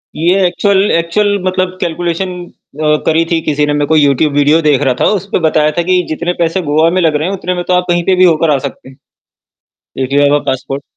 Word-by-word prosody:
ये 180 +4 +1
actual 200 +2 +1
actual 205 +5 0
मतलब 185 0 -2
calculation 175 +1 -3 0.4
अ, 150 0 +2
करी 160 +1 +2
थी 165 -1 +1
किसी 150 -1 0
ने 145 - -1
मैं 145 -1 -1
कोई 155 -1 +3
यूट्यूब 140 +1 +1
वीडियो 145 +3 +3
देख 145 -3 +2
रहा 130 -3 +1
था, - - +3
उसमें 195 -2 -3
बताया 155 -1 +2
था - - +2
कि 180 -1 +3
जितने 170 +3 -2
पैसे 170 +3 0
गोआ 160 +2 +3
में 185 +1 0
लग 160 -3 +1
रहे 155 +4 -1
हैं, - - -3
उतने 180 +1 -3
में 175 - -3
तो 180 - +1
आप 180 0 +1
कहीं 175 0 +1
पे 190 - +2
भी 185 - +3
होकर 165 -2 +3
आ 140 - +2
सकते 130 - -13
हैं। 135 - -17 1.1
If 130 - -6
you 145 - +3
have 145 0 +3
a - - -14
passport. 135 +1 -3
165 Hz, 240 wpm, -13 LUFS, 150-180 Hz, 1.1 s, कोई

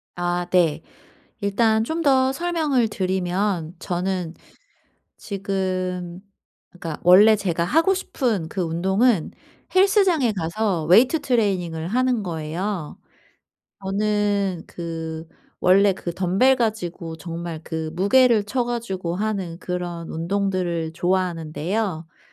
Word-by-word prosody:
아 175 0 -1
네. 170 -5 +3 0.6
일단 220 +2 +2
좀 320 +8 -2
더 265 -2 +4
설명을 310 -7 +1
드리면 185 -3 -1
저는 180 -1 -2 0.8
지금 185 -3 -3 0.5
그러니까 165 -4 -7
원래 200 +5 +7
제가 180 -5 -1
하고 325 - +3
싶은 235 - -2
그 190 - -3
운동은 190 +5 +1 0.4
헬스장에 375 - +4
가서 175 -2 -1
weight 250 - +5
training을 190 - 0
하는 250 0 +1
거예요. 170 +1 -4 0.9
저는 200 -2 0
그 165 -1 -6 0.3
원래 195 +2 +5
그 175 -2 -5
덤벨 195 +9 +3
가지고 180 -8 -3
정말 165 -1 -6
그 160 -1 -4
무게를 220 +4 +4
쳐 245 +4 -1
가지고 195 -8 -3
하는 195 -5 -3
그런 175 -2 -5
운동들을 175 -2 -1
좋아하는데요. 175 +2 -1 0.2
뭐 160 - -36
190 Hz, 255 characters per minute, -23 LUFS, 170-220 Hz, 0.9 s, 원래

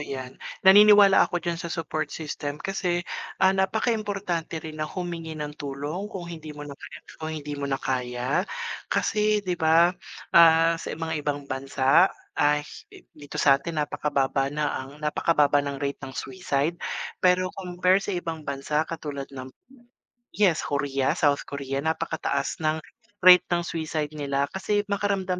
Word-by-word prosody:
'yan. 135 -2 -6 0.3
Naniniwala 205 0 +8
ako 175 0 -3
diyan 170 -1 -2
sa 170 - -5
support 160 -1 -3
system 145 -2 -5
kasi, 175 0 -2 0.4
ah, 190 0 +5
napaka 195 +5 +1
importante 195 -6 -3
rin 155 0 -8
na 155 - -2
humingi 170 -3 -5
ng 150 -1 -5
tulong 145 +8 -4
kung 185 -4 -7
hindi 160 -2 -8
mo 145 - -7
na 145 - -8
kaya, - - -11 0.2
kung 160 0 -4
hindi 145 -1 -6
mo 140 0 -3
na 135 - 0
kaya. 125 0 -1 0.4
Kasi, 210 -1 +1
'di 180 -1 -1
ba, 165 +2 +5 0.4
ah, 165 0 +7
sa - - -6
mga 160 -2 -3
ibang 145 -1 -3
bansa, 135 +5 +3 0.3
ah, 150 0 +3
hi - - -14
dito 145 -1 -10
sa 140 -1 +4
atin 165 +2 -6
napakababa 135 -2 0
na 150 +1 -1
ang 135 +2 -10
napakababa 150 -1 +3
ng 140 -1 -4
rate 140 0 -3
ng 130 - -9
suicide. 170 -3 -2 0.4
Pero 185 0 +3
compare 185 0 +1
sa 200 -1 -3
ibang 160 -3 -5
bansa, 150 +3 -1
katulad 145 -4 -5
ng 130 -1 -8 0.8
yes, 190 -6 +3
Korea, 140 -2 0
South 145 -2 +2
Korea. 140 -1 -4
Napakataas 160 -3 -2
ng 155 0 -1 0.4
rate 180 -1 +9
ng 175 0 +1
suicide 155 -2 -3
nila 140 -1 -1
kasi 205 +2 0
makaramdam 195 -3 0
160 Hz, 155 wpm, -25 LUFS, 140-180 Hz, 0.8 s, rate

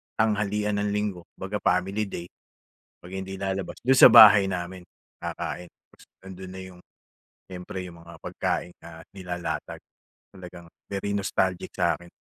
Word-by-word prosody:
tanghalian 105 -1 0
ng 105 0 0
Linggo 100 -5 -3
kumbaga 100 +2 -4
family 95 +4 0
day, 85 -2 -8 0.7
'pag 90 - -11
hindi 95 0 -6
lalabas, 95 0 -4
do'n 130 0 +4
sa - - +12
bahay 105 -4 +9
namin 90 0 -4 0.4
kakain, 90 -1 -5 0.2
tas - - -19 0.2
nandun 95 0 -9
na - - -7
'yong 90 -1 -13 0.7
siyempre 90 0 -7
'yung 85 -1 -12
mga 85 -1 -13
pagkain 90 - -3
na 80 -1 -12
nilalatag, 90 -5 -5 0.6
talagang 90 -2 -11 0.2
very 100 +1 -3
nostalgic 95 -2 -1
sa - - +3
akin. 85 0 -13
95 Hz, 140 wpm, -26 LUFS, 90-100 Hz, 0.7 s, sa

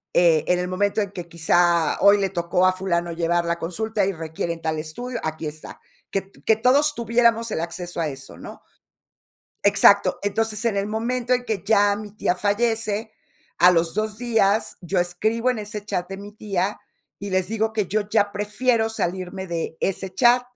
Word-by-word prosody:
Eh, 165 -3 +4
en 180 - +3
el 180 - -2
momento 200 +3 0
en 200 -1 -3
que 175 -3 -7
quizá 170 0 +2
hoy 200 0 +7
le 195 -1 0
tocó 175 0 +1
a 185 - +4
fulano 175 -2 -1
llevarla 170 0 0
a 170 - -8
consulta 205 +5 -2
y 195 - -1
requieren 165 0 -4
tal 160 -1 -1
estudio, 235 +11 -5
aquí 160 0 -4
está. 155 +1 -7 0.3
Que 195 - -1
t 195 - -22
que 220 - +4
todos 275 +6 +3
tuviéramos 230 -1 +2
el 160 - -1
acceso 175 0 -6
a 160 - 0
eso, 135 -2 -9
¿no? - - -10 1.0
Exacto. 200 0 +5
Entonces, 215 +2 -1
en 220 -3 +1
el 200 0 0
momento 235 +3 -2
en 250 0 +1
que 215 -7 -3
ya 205 -2 +4
mi 210 -1 -8
tía 180 -4 -1
fallece, 220 +1 0 0.5
a 180 - +7
los 165 -1 +1
2 215 +1 -2
días 220 -3 +1
yo 180 +2 -1
escribo 220 +8 0
en 250 - -2
ese 210 0 -5
chat 185 -4 -3
de 195 - -6
mi 205 +1 -10
tía, 205 -2 -2 0.4
y 200 0 -6
les 185 0 0
digo 220 0 -1
que 210 -4 -1
yo 215 +2 0
ya 205 -2 +2
prefiero 220 +3 0
salirme 190 -2 -3
de 165 -2 -4
ese 190 0 -2
chat, 240 +5 +5
200 Hz, 190 wpm, -23 LUFS, 175-220 Hz, 1.0 s, hoy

